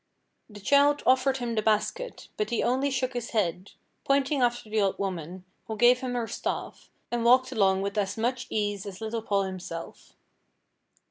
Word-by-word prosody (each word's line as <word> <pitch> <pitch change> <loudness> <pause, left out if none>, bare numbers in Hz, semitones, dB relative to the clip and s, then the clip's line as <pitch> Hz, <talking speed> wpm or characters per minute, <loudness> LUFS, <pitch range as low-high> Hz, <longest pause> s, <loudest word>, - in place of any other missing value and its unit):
The 210 -1 -11
child 285 +7 +3
offered 260 +1 +3
him 240 -2 -3
the 220 - +1
basket, 220 - -1
but 425 - -2
he 235 - 0
only 265 +3 +1
shook 260 -1 -1
his 240 -1 -4
head, 180 -1 -1 0.3
pointing 275 0 +2
after 240 -2 +1
the 215 0 0
old 195 -1 +1
woman, 185 -2 -4 0.2
who 220 - -4
gave 245 +2 +5
him 250 -1 -3
her 235 -2 -1
staff, - - -5 0.2
and 240 -1 -1
walked 255 +2 +5
along 195 -5 +2
with 200 0 -3
as 200 0 -2
much 245 +2 -1
ease 205 -2 -2
as 190 -2 -8
little 225 +1 -3
Paul 200 -2 +1
himself. 185 -3 -7
225 Hz, 180 wpm, -27 LUFS, 200-255 Hz, 0.3 s, gave